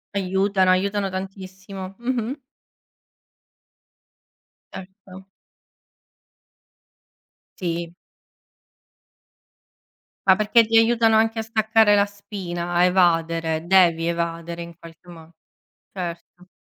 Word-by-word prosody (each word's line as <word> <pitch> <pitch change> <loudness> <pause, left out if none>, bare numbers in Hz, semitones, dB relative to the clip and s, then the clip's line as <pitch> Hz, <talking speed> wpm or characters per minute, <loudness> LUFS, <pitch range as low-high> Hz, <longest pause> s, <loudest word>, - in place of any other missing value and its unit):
Aiutano, 190 0 +1
aiutano 200 +1 0
tantissimo. 190 0 -8
Mh-mh. 245 +2 -3 2.4
Certo. 190 0 -12 2.3
Sì. 170 -1 -4 2.3
Ma 190 - +7
perché 215 +2 +3
ti 225 +1 -1
aiutano 225 -1 +4
anche 225 +1 +1
a - - 0
staccare 220 -1 +2
la 200 0 +3
spina, 190 -4 -6
a 175 +1 +3
evadere, 165 -3 +1
devi 170 -3 +4
evadere 170 0 -4
in 170 -1 -12
qualche 165 +1 -16
mo 165 -1 -14 0.6
Certo. 175 0 -8
190 Hz, 85 wpm, -22 LUFS, 170-205 Hz, 2.4 s, Ma